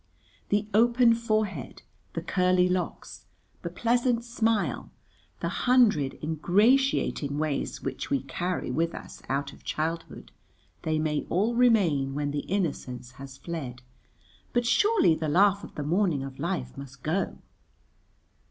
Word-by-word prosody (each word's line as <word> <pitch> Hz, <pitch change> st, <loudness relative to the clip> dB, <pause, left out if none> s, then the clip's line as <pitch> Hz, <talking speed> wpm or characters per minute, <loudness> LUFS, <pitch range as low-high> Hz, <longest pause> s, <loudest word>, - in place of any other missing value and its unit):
The 205 Hz, +1 st, +1 dB
open 235 Hz, +2 st, +5 dB
forehead, 215 Hz, -, -2 dB, 0.3 s
the -, -, -4 dB
curly 180 Hz, 0 st, +3 dB
locks, 180 Hz, 0 st, -3 dB, 0.3 s
the -, -, -4 dB
pleasant 240 Hz, 0 st, +1 dB
smile, 225 Hz, -3 st, 0 dB, 0.5 s
the -, -, -1 dB, 0.2 s
hundred 210 Hz, -, +4 dB
ingratiating 175 Hz, -, +2 dB
ways 155 Hz, -2 st, -2 dB
which 135 Hz, -1 st, -4 dB
we 135 Hz, -2 st, 0 dB
carry 175 Hz, +2 st, -3 dB
with 165 Hz, +6 st, 0 dB
us -, -, -10 dB
out 140 Hz, +1 st, -1 dB
of -, -, -17 dB
childhood, 165 Hz, +2 st, -4 dB, 0.5 s
they 155 Hz, -1 st, 0 dB
may 155 Hz, -1 st, -1 dB
all 210 Hz, +7 st, +1 dB
remain 185 Hz, -, +3 dB
when 145 Hz, 0 st, -1 dB
the 145 Hz, 0 st, -4 dB
innocence 130 Hz, -10 st, -2 dB
has 135 Hz, -1 st, -9 dB
fled, 135 Hz, -5 st, -6 dB, 0.7 s
but 240 Hz, 0 st, +2 dB
surely 350 Hz, -, +4 dB
the 155 Hz, -1 st, -2 dB
laugh 200 Hz, +5 st, +4 dB
of -, -, -10 dB
the 150 Hz, -, -3 dB
morning 165 Hz, -2 st, +1 dB
of 135 Hz, 0 st, -8 dB
life 165 Hz, -6 st, -3 dB
must 140 Hz, -1 st, -10 dB
go. 170 Hz, +6 st, -1 dB
170 Hz, 135 wpm, -27 LUFS, 140-220 Hz, 0.7 s, open